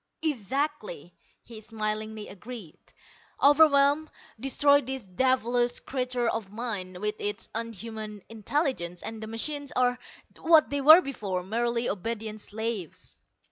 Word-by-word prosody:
"Exactly," 265 - -2 0.3
he 225 -2 -11
smilingly 215 0 -4
agreed. 205 -4 -10 0.6
"Overwhelm, 290 0 +5 0.3
destroy 285 +3 +4
this 265 -1 -5
devilish 245 +3 +1
creature 250 -2 -2
of 220 -4 -2
mine, 205 -5 -4
with 210 +1 0
its 205 0 -3
unhuman 220 -2 -6
intelligence, 220 - -2
and 225 0 -6
the 220 - -6
machines 285 +5 -2
are 250 0 +2 0.4
what 320 -4 +5
they 285 0 0
were 315 +6 +9
before: 200 - -3
merely 235 +4 -1
obedient 215 +1 -3
slaves." 220 -5 -5
230 Hz, 115 wpm, -27 LUFS, 210-270 Hz, 0.6 s, were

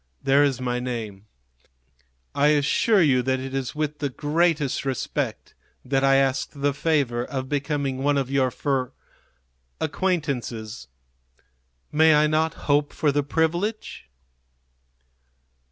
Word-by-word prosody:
There 140 +2 +4
is 140 -3 +1
my 125 -1 -2
name; 110 -5 -5 1.1
I 145 - +3
assure 150 +7 +3
you 130 -5 +3
that 130 +1 0
it 135 0 -6
is 135 -1 -3
with 150 -1 -3
the 145 - -1
greatest 150 +1 0
respect 135 -2 -3 0.3
that 135 +1 0
I 135 0 +5
ask 135 -1 +1
the 140 0 0
favor 135 -5 0
of 130 0 -4
becoming 140 -2 -2
one 145 +1 +1
of 135 -1 -2
your 135 -2 +2
fr 135 +1 -1 0.9
acquaintances. 135 - -2 1.0
May 160 0 +5
I 150 +1 +4
not 155 +1 +1
hope 145 0 +1
for 150 - +1
the 145 +1 +1
privilege?" 165 - -2
140 Hz, 125 wpm, -24 LUFS, 130-150 Hz, 1.1 s, I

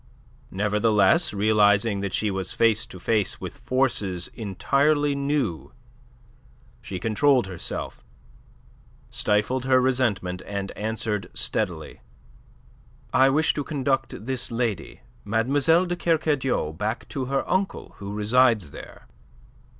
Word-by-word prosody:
Nevertheless, 105 - +2
realizing 105 0 +3
that 100 -1 -2
she 105 -2 0
was 95 -1 -3
face 115 -2 +2
to 90 - -11
face 105 +1 0
with - - -8
forces 105 -9 0
entirely 140 +8 +1
new, 140 - -2 1.1
she 95 - -6
controlled 125 +5 +2
herself, 90 -7 -6 1.1
stifled 115 +5 0
her 130 -1 +4
resentment, 120 -8 0
and 100 -1 -4
answered 110 -1 -3
steadily. - - -2 1.1
"I 135 +1 +5
wish 150 +3 +2
to 145 - -3
conduct 135 -6 -2
this 130 -1 -1
lady, 115 -4 -3 0.2
Mlle. 140 - +2
de 175 0 -2
Kercadiou, 150 - 0
back 105 +6 -3
to 135 -4 -3
her 135 +1 -1
uncle 190 +1 -2
who 100 0 -7
resides 105 - +2
there." - - -12
115 Hz, 110 wpm, -24 LUFS, 100-135 Hz, 1.1 s, I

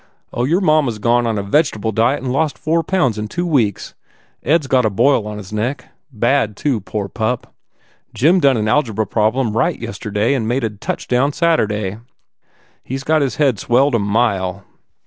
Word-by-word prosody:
Oh, 120 - 0
your 170 +8 +1
mamma 155 -6 +3
s - - -9
gone 120 +2 +1
on 110 -2 -1
a 100 - -2
vege 145 +8 +2
table 110 +1 -3
diet 115 +5 +1
and 130 - -2
lost 140 -2 0
four 165 +5 0
pounds 150 - 0
in 105 - -3
two 175 +10 -3
weeks. 120 - 0 0.5
Ed 165 +3 +2
s - - -8
got 130 -1 +2
a 110 - +2
boil 105 +2 +2
on 105 0 -6
his 105 0 -9
neck 120 +7 -3 0.2
bad, 115 -2 0
too, 135 -6 0
poor 100 +1 -4
pup. 115 +4 -3 0.6
Jim 160 - +3
done 140 -6 +3
an 110 0 -1
algebra 110 -3 +1
problem 110 +2 0
right 115 - +1
yesterday 105 0 -2
and 120 -5 -1
made 125 +3 0
a 110 - -1
touchdown 125 +6 -1
Saturday. 105 - 0 0.8
He 130 - -5
s 135 - -5
got 155 +2 +2
his 135 -2 -1
head 135 -9 +1
swelled 130 +6 +2
a 115 - +2
mile." 100 -3 0
120 Hz, 195 wpm, -18 LUFS, 105-140 Hz, 0.8 s, mamma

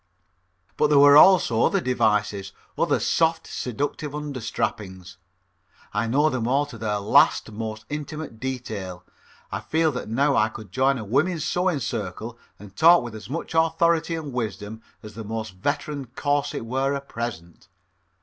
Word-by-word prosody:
But 150 - +3
there 150 -1 +4
were 145 0 +8
also 150 -9 +6
other - - +2
devices, 105 -6 0 0.2
other - - +1
soft, 165 0 +1
seductive 145 +4 -4
under 145 -4 -5
strappings. 95 -5 -4 0.8
I - - 0
know 145 +6 +3
them 120 -3 -2
all 140 +3 +2
to 120 -6 -11
their 105 -1 -1
last 100 +2 +3
most 110 0 -6
intimate 150 -4 -6
detail. 110 -8 -5 0.5
I 100 - -2
feel 160 +9 +1
that 125 -5 -6
now 140 +5 +2
I 110 - +3
could 110 -2 -11
join 135 +1 +2
a 110 - -6
woman's 145 - 0
sewing 180 -5 0
circle 110 0 -4 0.2
and 100 -2 -14
talk 170 +1 +6
with 120 -2 -7
as 110 +1 -10
much 165 +4 -5
authority 165 0 +2
and 150 -4 -6
wisdom 110 -2 -4 0.2
as 105 -1 -10
the 110 +2 -7
most 110 -1 -5
veteraned 140 -2 -3
corset 145 -4 -1
wearer 135 +3 -1
present. 110 -11 -7
125 Hz, 155 wpm, -24 LUFS, 110-145 Hz, 0.8 s, were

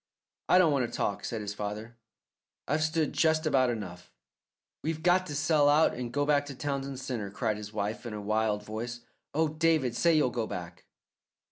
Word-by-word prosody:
"I - - +7
don't 180 -4 +5
want 135 -4 +1
to - - -12
talk," 100 - -1
said 115 -2 -3
his 105 -1 -4
father. 105 +3 -5 0.7
"I've 150 +2 +1
stood 155 -1 +1
just 160 0 +2
about 135 -4 +3
enough." 100 -7 -6 0.7
"We've 160 0 -3
got 185 +1 +3
to 145 - -5
sell 145 0 +3
out 150 +2 +4
and 120 -1 -5
go 145 +3 +1
back 145 -1 +2
to 140 - -7
Townsend 140 0 -3
Centre," 125 -6 -4
cried 110 0 -1
his 105 0 -8
wife 105 +1 -3
in 115 - -5
a - - -4
wild 105 0 0
voice. 115 +3 -5 0.3
"Oh, 160 +1 +3
David, 155 -5 +1
say 170 +5 +4
you'll 135 -5 +3
go 115 -2 -2
back." 85 -1 -7
130 Hz, 195 wpm, -29 LUFS, 110-150 Hz, 0.7 s, I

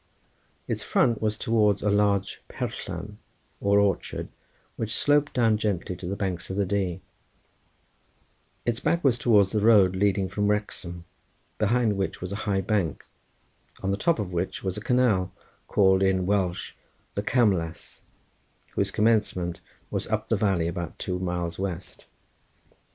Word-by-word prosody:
Its - - -2
front 115 -3 +2
was 110 -1 0
towards 105 -4 +2
a 105 - +2
large 100 -1 +1
perllan - - -5 0.4
or 100 0 +3
orchard, 100 -2 0 0.5
which 110 -1 -3
sloped 145 0 +2
down 115 -4 +3
gently 95 -4 -1
to 90 0 -7
the 95 - -2
banks 95 -3 -3
of 95 - -4
the 100 - +2
Dee; 95 -2 -1 1.6
its 120 -1 0
back 170 0 +1
was 125 -4 +3
towards 105 -6 +4
the 110 - +1
road 100 -4 +5
leading 100 0 +2
from 105 +2 -1
Wrexham, 90 -5 -2 0.5
behind 110 -1 +2
which 95 -1 -2
was 90 +1 -5
a - - -2
high 95 -1 +2
bank, 95 -4 -1 0.8
on 95 - 0
the - - +1
top 170 - +1
of 100 -5 -4
which 90 +2 -2
was 95 -1 -2
a 105 - -5
canal 110 -7 +2 0.4
called 95 -1 +4
in 95 -1 +2
Welsh 95 -3 0 0.4
the 100 - -1
Camlas, 95 -9 0 0.7
whose - - 0
commencement 105 -6 +1 0.3
was - - -2
up 110 0 -2
the 115 - +3
valley 95 -5 +1
about 85 -2 -4
two 90 -1 -3
miles 90 -1 -3
west. 95 -2 -5
100 Hz, 150 wpm, -26 LUFS, 95-110 Hz, 1.6 s, road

